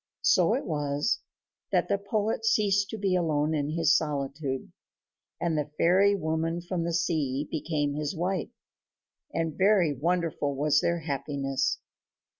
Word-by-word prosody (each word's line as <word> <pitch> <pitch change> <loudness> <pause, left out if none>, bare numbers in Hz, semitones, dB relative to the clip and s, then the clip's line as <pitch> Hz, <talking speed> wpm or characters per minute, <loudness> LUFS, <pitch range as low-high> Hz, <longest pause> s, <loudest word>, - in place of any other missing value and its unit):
So - - +4
it - - -3
was 145 -1 0 0.5
that - - +2
the 200 - +1
poet 215 +2 -1
ceased 200 -3 +2
to 220 - -5
be 195 -3 +1
alone 155 -3 +1
in 145 -1 -1
his 165 0 +4
solitude, 140 -2 -2 0.7
and 170 -2 0
the 150 -1 -1
fairy 195 +4 +4
woman 160 -1 -1
from 175 -1 -3
the 170 - -1
sea 150 -5 0
became 150 -2 -1
his 150 +3 -3
wife, 180 0 -1 0.8
and 165 -2 -2
very 190 -5 +4
wonderful 160 -1 -1
was 145 +1 +3
their 170 0 0
happiness. 140 -2 -1
160 Hz, 140 wpm, -28 LUFS, 145-180 Hz, 0.8 s, So